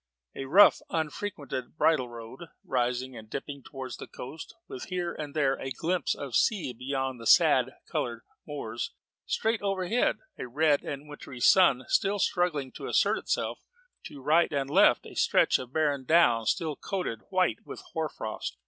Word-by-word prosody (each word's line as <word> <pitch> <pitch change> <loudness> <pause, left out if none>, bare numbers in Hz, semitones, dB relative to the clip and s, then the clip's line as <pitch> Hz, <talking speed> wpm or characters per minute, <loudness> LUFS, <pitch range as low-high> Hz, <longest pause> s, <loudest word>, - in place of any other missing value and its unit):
] 60 - -46
A 135 - -5
rough, 185 +10 +7
unfrequented 155 -4 -4
bridle 135 -8 +3
road 120 +7 -10 0.2
rising 125 0 -1
and 110 -2 -11
dipping 140 +2 -6
towards 130 -3 -7
the - - -8
coast, 155 - -9
with 125 - -7
here 180 -2 -3
and 150 -1 -7
there 140 -3 +3
a 135 - -4
glimpse 165 +5 -1
of 140 -4 -5
sea 185 - +2
beyond 130 +1 -3
the 115 - -4
sad - - +5
coloured 115 -1 -3 0.2
moors: 120 -6 -5 0.3
straight 225 0 0
overhead, 195 +3 +1 0.2
a - - -4
red 145 +3 +2
and 145 +1 -6
wintry 145 -3 -10
sun 135 -4 +5
just 200 0 +2
struggling 155 -7 -1
to - - -8
assert - - +2
itself: - - -2 0.5
to 140 - -10
right 160 +4 +3
and 140 -1 -2
left, 180 -8 +5
a - - -10
stretch - - +3
of 125 -1 -8
barren 145 -3 0
down 120 -7 +4
still 160 -5 0
coated 180 - -4
white 185 - +2
with - - -9
hoar 160 -1 -1
frost. 110 -4 -6
140 Hz, 165 wpm, -28 LUFS, 125-170 Hz, 0.5 s, rough